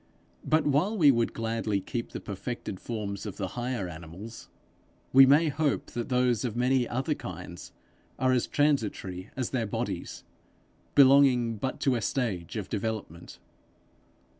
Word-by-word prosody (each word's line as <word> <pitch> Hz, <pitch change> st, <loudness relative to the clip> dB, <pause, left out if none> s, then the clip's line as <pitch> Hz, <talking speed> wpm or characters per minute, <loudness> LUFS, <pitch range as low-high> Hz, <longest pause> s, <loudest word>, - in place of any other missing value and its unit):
But 155 Hz, 0 st, +2 dB
while 160 Hz, +10 st, +2 dB
we 150 Hz, -6 st, +7 dB
would 115 Hz, -2 st, +1 dB
gladly 115 Hz, -2 st, -1 dB
keep 115 Hz, +4 st, -4 dB
the -, -, -5 dB
perfected 100 Hz, -1 st, -6 dB
forms 105 Hz, -3 st, -5 dB
of 100 Hz, -, -7 dB
the 95 Hz, -3 st, -3 dB
higher 120 Hz, -3 st, -3 dB
animals, 90 Hz, +7 st, -10 dB, 0.6 s
we 135 Hz, 0 st, +9 dB
may 150 Hz, +4 st, +5 dB
hope 145 Hz, 0 st, -1 dB
that 120 Hz, +3 st, -4 dB
those 125 Hz, -3 st, +2 dB
of 120 Hz, -3 st, -2 dB
many 125 Hz, 0 st, +2 dB
other 135 Hz, +5 st, 0 dB
kinds 90 Hz, -, -8 dB, 0.5 s
are 130 Hz, 0 st, +2 dB
as 125 Hz, -2 st, +1 dB
transitory 110 Hz, -10 st, 0 dB
as 130 Hz, -3 st, -2 dB
their 120 Hz, -4 st, -1 dB
bodies, -, -, -4 dB, 0.7 s
belonging 130 Hz, -4 st, +5 dB
but 130 Hz, +5 st, -3 dB
to 135 Hz, -, +3 dB
a 120 Hz, -, -1 dB
stage 105 Hz, -8 st, -2 dB
of 100 Hz, -3 st, -4 dB
development. 105 Hz, -6 st, -5 dB
120 Hz, 145 wpm, -28 LUFS, 100-135 Hz, 0.7 s, we